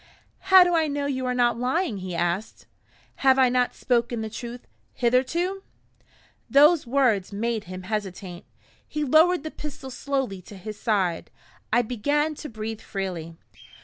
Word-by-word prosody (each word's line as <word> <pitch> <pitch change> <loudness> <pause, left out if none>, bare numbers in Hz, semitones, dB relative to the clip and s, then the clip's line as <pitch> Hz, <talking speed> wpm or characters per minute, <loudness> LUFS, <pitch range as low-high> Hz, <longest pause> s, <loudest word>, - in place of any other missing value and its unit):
"How 375 -1 +9
do 355 0 0
I 320 -1 +2
know 285 -1 -2
you 260 -2 -2
are 250 - 0
not 240 -1 +2
lying?" 260 - 0
he 185 -1 -5
asked. 175 +5 -2 0.5
"Have 265 -1 +4
I 260 -1 +5
not 250 0 +1
spoken 240 -2 0
the 220 -1 -5
truth, 240 +1 -7 0.3
hitherto?" 265 +11 0 0.9
Those 295 +1 +5
words 235 -8 +2
made 220 +1 -2
him 185 0 -8
hesitate. 190 -3 -5 0.4
He 300 - -3
lowered 315 +4 +4
the 315 - -5
pistol 275 -3 -8
slowly 260 -8 -2
to 200 +2 -12
his 210 +2 -8
side. 190 -7 0 0.4
I 245 +2 +4
began 285 +7 0
to 300 - -7
breathe 220 -1 -6
freely. 175 -4 -5
245 Hz, 150 wpm, -25 LUFS, 205-280 Hz, 0.9 s, How